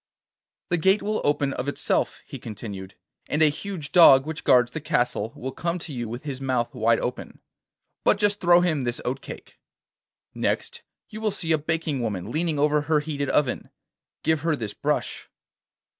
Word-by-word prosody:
'The 175 - +2
gate 190 +5 +3
will 215 +1 -1
open 145 -1 +1
of 125 - -4
itself,' 140 - -1
he - - -8
continued, 100 -4 -8 0.3
'and 150 +2 +3
a 155 - +7
huge 160 -1 -6
dog 135 -6 +8
which 160 0 -5
guards 125 -1 +4
the 160 - -5
castle 125 -8 0
will 130 +2 -5
come 170 +5 -2
to 160 -3 -8
you 120 -3 -4
with 120 +4 -6
his 135 -3 -5
mouth 130 -3 -1
wide 115 +1 +2
open, 125 - -5 0.6
but - - +4
just 205 0 +1
throw 175 -1 +6
him 160 -5 +1
this 120 -1 -2
oat 130 +2 -2
cake. - - -11 0.7
Next, 475 -1 -2 0.3
you 215 0 -8
will 220 - +1
see 165 -4 -2
a 160 - +4
baking 155 -3 -2
woman 105 -3 -3
leaning 160 +1 0
over 150 +1 +3
her 150 +1 +2
heated 145 -2 -3
oven. 140 -4 0 0.5
Give 160 -2 +1
her 165 0 +1
this 110 -7 -5
brush. - - -2
150 Hz, 180 wpm, -25 LUFS, 125-165 Hz, 0.7 s, dog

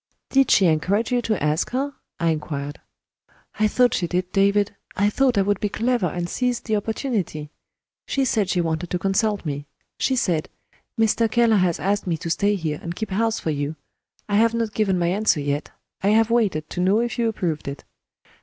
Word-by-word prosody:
"Did 270 -1 +4
she 195 - +5
encourage 180 +8 +1
you 245 -1 +2
to 215 -8 -1
ask 150 +3 +1
her?" 275 +3 -2 0.3
I 170 -1 +2
inquired. 145 -2 -4 0.8
"I 215 - +4
thought 245 +3 +3
she 175 - 0
did, 180 +1 -2
David 200 +1 +2 0.2
I 205 +2 +2
thought 255 -1 +2
I 195 - +4
would 205 0 0
be 210 - -1
clever 230 -1 0
and 175 +1 -3
seize 250 +5 -1
the 220 - -2
opportunity. 205 - -2 0.6
She 275 -1 +1
said 210 -6 +1
she 180 -3 +1
wanted 165 +1 -2
to 180 - 0
consult 200 +2 0
me. 145 -1 -4 0.3
She 265 - +1
said: 170 -10 0 0.5
'Mr. 225 +1 +3
Keller 230 -1 +3
has 180 -3 +1
asked 200 +1 0
me 165 -2 0
to 165 - -4
stay 205 +4 +2
here, 155 -5 -3
and 170 0 -5
keep 220 0 -5
house 225 +3 +1
for 160 - -2
you; 145 +1 -2 0.5
I 205 -1 +1
have 230 +1 +3
not 225 -2 -1
given 200 -4 +1
my 175 - +1
answer 195 -3 +2
yet, 145 +1 -2 0.3
I 195 - 0
have 225 +2 +4
waited 200 -10 +1
to 180 - -2
know 195 +4 +3
if 240 +1 -2
you 230 -1 +2
approved 170 -9 -3
it.' 140 0 -6
200 Hz, 200 wpm, -23 LUFS, 170-225 Hz, 0.8 s, she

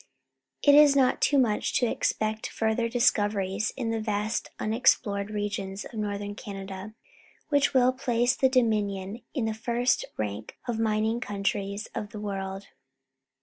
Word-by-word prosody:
It 285 - +7
is 290 -1 +7
not 260 -2 +3
too 285 - +3
much 230 -6 +1
to 245 - +3
expect 220 -1 -1
further 225 +1 0
dis 245 +1 +4
coveries 205 0 -1
in 235 -4 -2
the 225 - -1
vast 215 +1 -2
unexplored 215 -3 +1
regions 205 -2 -3
of - - -11
Northern 205 -1 -3
Canada, 195 0 -8 0.5
which 285 -1 +2
will 255 0 +5
place 245 -2 +1
the 265 - +3
Doininion 210 -4 0
in 250 -6 0
the 220 - -1
first 235 +3 0
rank 105 0 -4
of 235 -2 -1
the 225 - 0
mining 220 +1 +1
countries 200 -1 -2
of 210 - -4
the 210 - -8
world. 195 -1 -5
215 Hz, 150 wpm, -27 LUFS, 200-240 Hz, 0.5 s, It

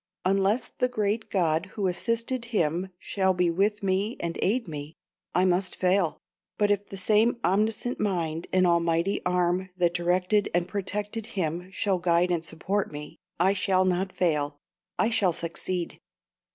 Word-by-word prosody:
Unless 195 +5 +2
the 250 - +3
great 215 -2 -1
God 165 -1 +1
who 200 - 0
assisted 230 +6 -1
him 180 -5 0
shall 190 0 0
be 175 -1 +2
with 205 +4 +1
me 195 +4 0
and 170 -1 -3
aid 230 +3 +1
me, 150 0 -7 0.4
I 180 +1 +4
must 185 0 +1
fail; 180 -3 +2 0.4
but 205 -1 +3
if 205 0 0
the 195 - -8
same 215 +5 +3
omniscient 215 +5 +1
mind 170 -6 -1
and 185 0 +4
almighty 170 +2 +2
arm 180 +1 +1
that 175 -1 +2
directed 180 +4 +1
and 175 0 +1
protected 205 +3 -3
him 175 +1 -2
shall 190 -1 0
guide 175 0 +2
and 170 -2 0
support 185 +5 -2
me, 150 0 -8 0.2
I 190 +3 +4
shall 185 -1 +2
not 185 +1 0
fail 150 -6 0 0.4
I 230 - +2
shall 190 -6 +3
succeed. 170 +2 -3
185 Hz, 155 wpm, -27 LUFS, 175-205 Hz, 0.4 s, I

